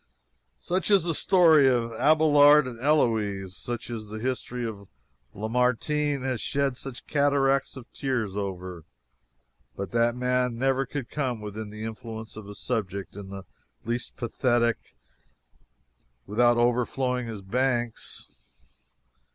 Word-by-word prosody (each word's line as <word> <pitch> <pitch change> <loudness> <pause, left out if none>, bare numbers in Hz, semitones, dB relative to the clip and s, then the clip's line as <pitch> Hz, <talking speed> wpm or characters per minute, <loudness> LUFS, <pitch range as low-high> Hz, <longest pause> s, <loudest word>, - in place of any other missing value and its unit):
Such 185 +3 -2
is 200 -4 +5
the 170 -1 0
story 160 -5 +5
of 115 -2 0
Abelard 150 +1 +6
and 120 -3 -7
Heloise. 110 -9 +1
Such 120 0 -5
is 110 -3 -6
the 110 - -6
history 125 +1 -3
that 100 -3 -7 0.5
Lamartine 125 +6 0
has 130 -4 -2
shed 140 -2 0
such 125 -1 -7
cataracts 140 -2 +1
of 125 - -9
tears 120 -8 -2
over. 90 -4 -5 0.9
But 100 0 -5
that 115 0 +2
man 125 -1 0
never 135 +1 +1
could 135 -3 -5
come 130 -6 -2
within 105 0 -6
the 105 +1 -8
influence 110 0 -7
of 105 -2 -9
a 105 - -8
subject 100 -3 -3
in 100 -1 -8
the 100 -1 -7 0.4
least 120 +1 -3
pathetic 120 0 0 1.3
without 120 +3 +3
overflowing 125 +1 +1
his 110 -3 -6
banks. 120 +2 -3
120 Hz, 125 wpm, -26 LUFS, 110-135 Hz, 1.3 s, Abelard